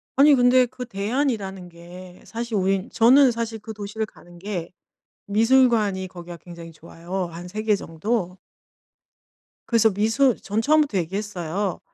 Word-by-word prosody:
아니 285 +2 +6
근데 250 0 +5
그 250 +1 -8
대안이라는 200 -4 -2
게 175 +2 -13
사실 235 0 -5
우린 195 0 0
저는 255 +3 +5
사실 230 -1 -4
그 220 +1 -8
도시를 215 +1 -4
가는 175 -4 -17
게 180 -3 -5 0.6
미술관이 220 -3 +2
거기가 175 -1 -10
굉장히 170 0 -11
좋아요, 170 +3 -6
한 170 +2 -8
3 215 +4 -5
개 215 -1 +2
정도. 180 +2 -3 1.3
그래서 230 -2 +3
미술 225 +5 +1
전 215 +2 -2
처음부터 295 -4 +2
얘기했어요. 190 0 -3
205 Hz, 290 characters per minute, -23 LUFS, 180-235 Hz, 1.3 s, 아니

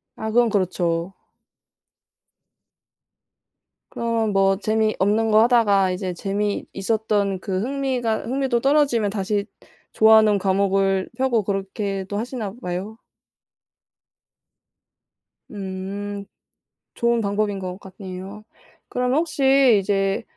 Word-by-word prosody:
아 220 - -4
그건 240 +1 +3
그렇죠. 180 -3 -1 2.8
그러면 230 -2 -1
뭐 195 0 +3
재미없는 215 0 +1
거 215 +1 +6
하다가 205 -6 +3
이제 185 0 -3
재미있었던 200 +1 -1
그 190 -1 -3
흥미가 255 -3 -1
흥미도 260 -1 0
떨어지면 270 -6 +2
다시 200 0 -1 0.5
좋아하는 220 -2 +5
과목을 195 0 +1
펴고 255 -4 +1
그렇게도 195 0 -3
하시나 225 -3 -4
봐요? 185 +4 -5 2.5
음. 200 +1 -6 0.7
좋은 235 0 +1
방법인 205 0 -1
것 185 0 -6
같네요. 190 +1 -9 0.5
그러면 250 +2 0
혹시 270 -7 +4
이제 195 +1 0
205 Hz, 215 characters per minute, -22 LUFS, 195-230 Hz, 2.8 s, 거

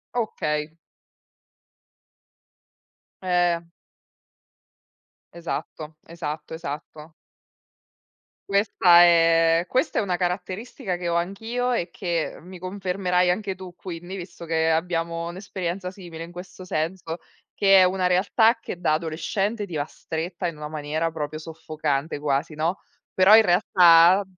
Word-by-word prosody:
Okay. 150 -10 -2 2.5
Ehm. 175 -2 +1 1.6
Esatto, 160 -2 -6
esatto, 155 -2 -6
esatto. 155 0 -8 1.3
Questa 200 -3 +5
è 165 0 +4
questa 260 +5 0
è - - +2
una 185 -4 -1
caratteristica 185 +3 -3
che 175 -1 -4
ho 170 - 0
anch'io 225 +8 -2
e 190 -8 -1
che 170 -3 -3
mi 180 +2 -11
confermerai 185 -1 0
anche 195 +1 -1
tu 185 -1 -10
quindi, 175 0 -7
visto 175 -1 -9
che 160 0 +1
abbiamo 165 0 -1
un'esperienza 180 0 -4
simile 175 -4 -9
in 170 - -10
questo 185 +1 -10
senso, 165 0 -3 0.3
che 195 -1 +5
è - - +7
una 185 0 +1
realtà 220 +6 +3
che 205 - -7
da 170 -3 +1
adolescente 195 +7 -2
ti 175 -5 -8
va 145 -1 -1
stretta 170 +3 -5
in 165 -3 -6
una 150 0 -6
maniera 155 +2 -2
proprio 155 -1 -4
soffocante 155 -2 -3
quasi, 145 +2 -1
no, 165 +5 -1 0.3
però 190 +3 +7
in 225 - +7
realtà 175 0 +6
175 Hz, 120 wpm, -24 LUFS, 160-185 Hz, 2.5 s, è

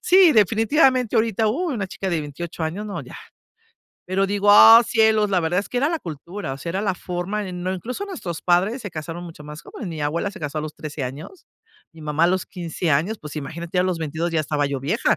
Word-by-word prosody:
Sí, 370 -3 +6
definitivamente, 235 - +3
ahorita, 220 -1 +2
uh, 335 +10 -1
una 200 -4 -2
chica 190 - -4
de 165 - 0
28 160 +3 -6
años, 190 +7 -4
no, 205 - -5
ya, - - -11 0.9
pero 190 +2 +1
digo 205 +1 +2
ah 225 +3 +10
cielos. 220 -2 +3
La 185 - +2
verdad 170 +2 0
es - - -9
que 245 - -2
era 280 - +2
la 330 - -1
cultura, 170 +1 -6
o - - -10
sea, 170 - -5
era 190 +3 -2
la 195 -3 0
forma 180 +4 -4
en 180 -1 -6
no, 185 +1 -1
incluso 250 - -5
nuestros 180 - -6
padres 190 +8 +2
se 205 - -6
casaron 165 +2 -6
mucho 165 -3 -11
más 150 +1 -9
joven, 205 - -8
mi 160 -3 -6
abuela, 170 +7 -1
se 210 - -11
casó 150 0 -3
a - - -1
los 155 -1 -6
13 155 -2 -6
años. 150 - -9 0.5
Mi 160 - -13
mamá 150 +2 +1
a - - +5
los 185 0 0
15 170 -1 -3
años, 170 +10 +1
pues 150 -2 -9
imagínate, 165 +5 -4
ya - - +4
los 185 -3 -1
22 160 +2 -2
ya 160 - +2
estaba 145 -1 0
yo 140 -2 -3
vieja. 185 - +1
180 Hz, 235 wpm, -22 LUFS, 160-210 Hz, 0.9 s, ah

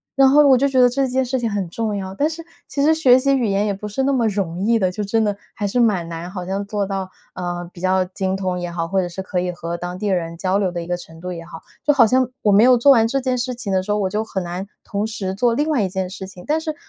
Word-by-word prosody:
然 270 0 +6
后 290 +1 +6
我 265 -2 +6
就 275 +3 +2
觉 265 -2 +1
得 245 - +6
这 270 +2 0
件 260 +1 +1
事 260 +1 -1
情 235 - -1
很 200 -4 -2
重 215 +3 -2
要， 190 -1 -5
但 290 +8 +2
是 330 +1 -7 0.2
其 280 - -2
实 315 +2 +4
学 260 -5 +5
习 275 +1 +2
语 250 - 0
言 200 0 +1
也 205 - 0
不 210 +2 -7
是 210 +6 -2
那 275 - +2
么 240 -4 +2
容 190 -5 -2
易 225 +3 +2
的， 185 -3 +1
就 210 +3 -4
真 220 +3 +1
的 205 -2 -1 0.2
还 205 - -2
是 225 +5 0
蛮 205 -8 +2
难 170 +2 -6
好 180 -2 -5
像 195 +2 -3
做 205 0 -2
到， 195 -1 -3 0.3
呃， 175 -1 -4
比 - - -12
较 185 0 +2
精 190 +1 -2
通 185 -2 -2
也 175 0 -4
好， 165 -1 -3
或 195 +3 0
者 180 - -2
是 175 +2 -6
可 190 -1 -2
以 180 0 -2
和 170 -1 -5
当 180 +1 -6
地 210 - -2
人 170 -4 -1
交 185 +3 0
流 195 -3 0
的 175 -1 -4
一 170 - -8
个 175 - 0
程 165 -2 -13
度 180 +1 -5
也 165 -1 -8
好， 165 -1 -10 0.2
就 295 - +4
好 255 -5 +6
像 255 +2 +3 0.2
我 210 - +4
没 200 +3 +6
有 255 0 +7
做 280 +4 +6
完 225 -4 +5
这 275 +4 0
件 255 -1 0
事 250 +1 -2
情 235 -4 -5
的 185 -1 +1
时 205 - -3
候， 210 - +1
我 190 - 0
就 210 +3 -1
很 200 -3 -4
难 180 +3 -5 0.2
同 205 +1 -2
时 205 -4 -3
做 235 +3 +2
另 295 +6 0
外 280 -9 +2
一 190 - -1
件 190 0 -3
事 190 0 -7
情， 180 -2 -12
但 310 +2 +1
是 315 -1 -3
200 Hz, 340 characters per minute, -20 LUFS, 185-245 Hz, 0.3 s, 有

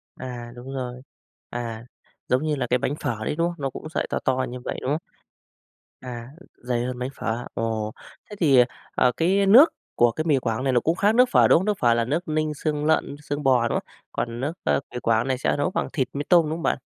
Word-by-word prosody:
À, 120 -2 -7
đúng 125 +2 -8
rồi, 125 -1 -5 0.5
à, 115 -1 -5 0.4
giống 130 +3 +2
như 155 -1 0
là 130 -3 -2
cái 125 +1 +2
bánh 140 - -1
phở 110 -7 -3
đấy, - - -1
đúng 170 +2 +1
không? 175 - -4
Nó 135 - 0
cũng 155 - -8
sợi - - -2
to - - -1
to 130 0 +2
như 125 +1 -6
vậy, 125 - -5
đúng 130 - -2
không? 150 - +1 1.0
À, 120 -2 -7 0.3
dày 120 -1 -2
hơn 125 0 -4
bánh 125 +1 -2
phở. 115 +2 -3
Ồ! 110 -1 -2 0.4
Thế 210 - -7
thì, 135 -8 +6 0.3
ờ, 125 - +3
cái 195 +4 +2
nước 270 - +8 0.2
của 120 0 +4
cái 155 - -3
mì 150 -4 +3
Quảng 120 0 -2
này 135 - +2
nó 120 - +4
cũng 165 +6 0
khác 205 +3 +3
nước 250 +2 +5
phở, - - +6
đúng - - +6
không? 185 - -3
Nước 210 -2 0
phở 120 -1 +4
là 115 0 +1
nước 160 +8 -2
ninh 155 0 0
xương 150 0 -2
lợn, 155 -2 +1
xương 145 0 -4
bò, 125 -4 +3
đúng - - 0
không? - - -9 0.3
Còn 115 0 -3
nước, 140 +4 -1
ơ, - - +2
mì - - -2
Quảng 115 +1 +2
này 130 -1 0
sẽ - - +1
nấu 145 +5 0
bằng - - -2
thịt 130 -4 0
mí 145 +1 -3
tôm, 175 -2 +7
đúng 155 +1 -2
không - - -7
bạn? - - +1
130 Hz, 250 wpm, -24 LUFS, 120-155 Hz, 1.0 s, nước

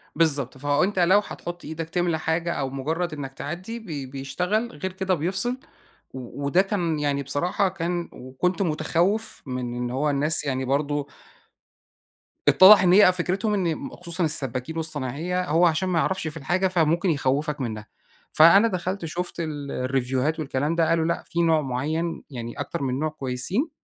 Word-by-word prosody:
بالضبط، 145 -5 +1
فأنت 145 +8 +1
لو 185 +4 +5
هتحُط 175 -3 -7
إيدك 160 +1 -5
تملى 175 -2 0
حاجة 165 +2 -1
أو 135 -1 -2
مجرّد 155 +5 -2
إنَّك 135 -2 -6
تعدّي 180 - -6
ب 220 - -15 0.3
بيشتغل، 180 - -2
غير 190 -1 -5
كده 190 0 -1
بيفصِل 190 - 0 0.6
و 130 +2 -7
وده 175 +7 +4
كان 175 -6 -1
يعني 140 -1 0
بصراحة، 175 +8 0
كان 175 -1 -3
وكنت 135 +10 -2
متخوّف 175 +5 0
من 125 -2 -4
إن 120 0 -3
هو 145 +4 0
الناس 150 +3 +1
يعني 130 -1 -1
برضه 145 +2 -1 1.4
اتّضح 195 +1 +9
إن 180 -1 +4
هي 200 -1 +8
أ - - +6
فكرتهم 185 +4 -1
إن 175 -5 -1
خصوصًا 170 0 -1
السبّاكين 135 0 -2
والصنايعية 160 +3 -2
هو 170 +2 +3
علشان 170 +3 +1
ما 175 - +1
يعرَفش 190 -1 0
في 155 - -9
الحاجة 175 +6 0
فممكن 170 0 +2
يخوّفك 145 +1 0
منّها، 110 -4 -4 0.5
فأنا 195 +8 +7
دخَلت 185 -1 -3
شوفت 175 +2 -4
ال 145 -4 -4
الريفوهات 130 +4 -1
والكلام 145 +1 -1
ده، 165 -1 +2
قالوا 165 -1 +2
لأ، 170 +1 -1
في 170 -1 -1
نوع 160 -2 +3
معيّن، 155 +5 -2
يعني 120 -2 -6
أكتر - - -4
من 130 -1 -1
نوع 155 +2 0
كويسين، 150 - -2
160 Hz, 165 wpm, -24 LUFS, 140-180 Hz, 1.4 s, اتّضح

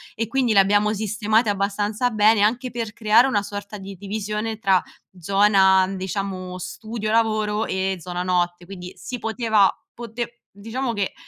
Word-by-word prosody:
e 225 - -1
quindi 245 -1 +1
le 200 - +6
abbiamo 205 +2 +3
sistemate 215 +2 +1
abbastanza 205 +4 0
bene, 215 -1 +4
anche 240 +4 +1
per 230 -2 -4
creare 215 -1 +1
una 205 -6 0
sorta 205 +1 -7
di 195 0 -9
divisione 210 +2 -4
tra 190 -3 +3 0.4
zona 195 +1 +4
n 195 +1 -5
diciamo, 185 -1 -4
studio 215 +3 -5
lavoro 215 -1 +1
e 190 0 -1
zona 180 +1 -4
notte, 175 -1 -1
quindi, 180 -1 -9
si 250 - -7
poteva 220 -3 +2 0.2
pote 235 0 -6 0.2
diciamo 230 +5 -4
che 200 -2 -2
210 Hz, 155 wpm, -22 LUFS, 195-225 Hz, 0.4 s, le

